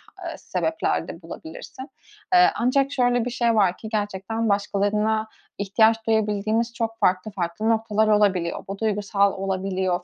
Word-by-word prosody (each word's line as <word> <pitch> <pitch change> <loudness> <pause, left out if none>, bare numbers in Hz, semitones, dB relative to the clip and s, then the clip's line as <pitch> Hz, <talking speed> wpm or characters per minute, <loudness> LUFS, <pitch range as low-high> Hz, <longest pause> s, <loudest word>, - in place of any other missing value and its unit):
h - - -7
sebepler 320 0 -1
de - - -9
bulabilirsin. 300 -4 -9 0.5
Eee, 360 0 +7
ancak 270 +3 +1
şöyle 245 -3 +1
bir - - -1
şey 235 -2 +1
var 190 -4 +3
ki, 220 - -8
gerçekten 215 +1 -2
başkalarına 210 +2 0 0.3
ihtiyaç 220 +3 +2
duyabildiğimiz 220 +1 0
çok 225 -1 -3
farklı 185 +3 +1
farklı 190 +3 -2
noktalar 220 -1 +1
olabiliyor. 200 -5 +2
Bu 195 +1 -5
duygusal 200 -2 +1
olabiliyor, 190 -2 -2
215 Hz, 140 wpm, -24 LUFS, 195-230 Hz, 0.5 s, Eee